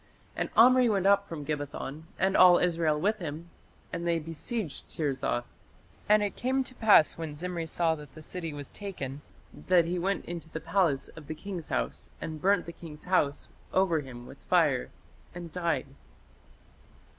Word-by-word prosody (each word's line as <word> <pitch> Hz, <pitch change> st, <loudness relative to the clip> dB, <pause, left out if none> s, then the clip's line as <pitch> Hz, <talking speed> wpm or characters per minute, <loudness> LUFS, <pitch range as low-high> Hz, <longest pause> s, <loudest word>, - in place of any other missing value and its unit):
And -, -, -2 dB
Omri 250 Hz, +1 st, +7 dB
went 195 Hz, -3 st, +1 dB
up 200 Hz, 0 st, +4 dB
from 150 Hz, -3 st, -6 dB
Gibbethon 145 Hz, 0 st, -4 dB
and 190 Hz, +1 st, +2 dB
all 180 Hz, -1 st, +8 dB
Israel 165 Hz, -3 st, +1 dB
with 210 Hz, +5 st, +1 dB
him, 165 Hz, 0 st, -6 dB, 0.4 s
and 170 Hz, 0 st, -3 dB
they 170 Hz, -1 st, +2 dB
besieged 165 Hz, +4 st, -5 dB
Tirzah. 135 Hz, -5 st, -1 dB, 0.7 s
And 210 Hz, 0 st, +6 dB
it 205 Hz, -, -2 dB
came 265 Hz, +2 st, 0 dB
to 255 Hz, -, -7 dB
pass 210 Hz, -10 st, +5 dB
when 160 Hz, -3 st, -5 dB
Zimri 170 Hz, +1 st, -3 dB
saw 165 Hz, 0 st, +1 dB
that 150 Hz, -4 st, -10 dB
the 155 Hz, -, -10 dB
city 165 Hz, 0 st, -5 dB
was 145 Hz, -2 st, -6 dB
taken, 150 Hz, -9 st, -6 dB, 0.3 s
that 180 Hz, -2 st, +3 dB
he 175 Hz, +1 st, -1 dB
went 195 Hz, +3 st, -1 dB
into 170 Hz, -1 st, -6 dB
the 160 Hz, -, -5 dB
palace 165 Hz, -4 st, +1 dB
of 155 Hz, -3 st, -12 dB
the 155 Hz, -, -4 dB
king's 180 Hz, -1 st, -6 dB
house, -, -, -3 dB
and 155 Hz, -2 st, -6 dB
burnt 200 Hz, +2 st, +3 dB
the 170 Hz, -, -6 dB
king's 155 Hz, -3 st, -11 dB
house 165 Hz, -6 st, +1 dB, 0.3 s
over 185 Hz, -4 st, +3 dB
him 125 Hz, -4 st, -9 dB
with -, -, -12 dB
fire, 65 Hz, -, +2 dB, 0.5 s
and 175 Hz, -2 st, -7 dB
died." 170 Hz, -1 st, -1 dB
170 Hz, 170 wpm, -29 LUFS, 150-190 Hz, 0.7 s, all